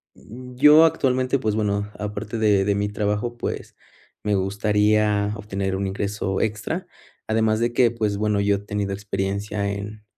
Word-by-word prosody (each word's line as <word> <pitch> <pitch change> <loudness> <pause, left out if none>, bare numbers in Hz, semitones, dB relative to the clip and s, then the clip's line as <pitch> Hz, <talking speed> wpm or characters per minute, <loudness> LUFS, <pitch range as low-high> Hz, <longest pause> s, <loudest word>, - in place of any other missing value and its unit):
mm, 125 +3 -12
yo, 150 +5 +7
actualmente, 130 -3 +1
pues, 110 -3 -1
bueno, 105 -1 -1
aparte 105 +2 -4
de 105 -3 +3
de 100 0 +1
mi 100 0 -1
trabajo, 105 +3 -2
pues, - - -5 0.5
me 105 -1 +1
gustaría 105 +1 +1
obtener 100 -2 -3
un 95 +1 -2
ingreso 95 0 -2
extra, 110 - -2 0.4
además, 110 0 +1
de 120 0 +1
que, 120 -1 +4
pues, 105 -3 -1
bueno, 105 -1 +1
yo 100 0 +2
he - - -7
tenido 100 -1 -3
experiencia 100 +1 -2
en 105 +1 -6
105 Hz, 160 wpm, -23 LUFS, 100-110 Hz, 0.5 s, yo